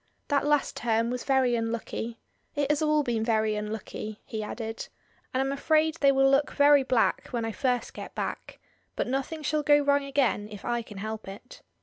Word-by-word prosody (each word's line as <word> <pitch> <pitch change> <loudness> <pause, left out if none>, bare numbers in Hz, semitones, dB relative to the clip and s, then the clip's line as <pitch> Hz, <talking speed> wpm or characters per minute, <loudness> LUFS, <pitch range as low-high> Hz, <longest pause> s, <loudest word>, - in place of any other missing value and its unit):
That 285 0 +2
last 295 -1 +1
term 230 0 +1
was 250 0 -3
very 265 -3 +3
unlucky. 230 0 -3 0.4
It 290 0 +1
has 300 - +1
all 305 -1 +3
been 235 -4 -1
very 220 -1 +1
unlucky," 210 0 -5
he 220 - -4
added, 225 +1 -5 0.4
"and 260 - 0
I'm 270 0 0
afraid 310 +3 +2
they 280 -1 +6
will 270 0 +4
look 275 +2 +3
very 285 0 +6
black 255 -3 +1
when 235 -2 -2
I 225 - -2
first 250 +1 -1
get - - -8
back, - - -5 0.4
but - - 0
nothing 275 +5 -3
shall 305 0 +1
go 290 0 +5
wrong 285 0 +2
again 265 -7 0
if 205 -2 -10
I 240 0 0
can 210 -3 -11
help 215 +1 -5
it. 205 +6 -11
250 Hz, 195 wpm, -28 LUFS, 225-285 Hz, 0.4 s, they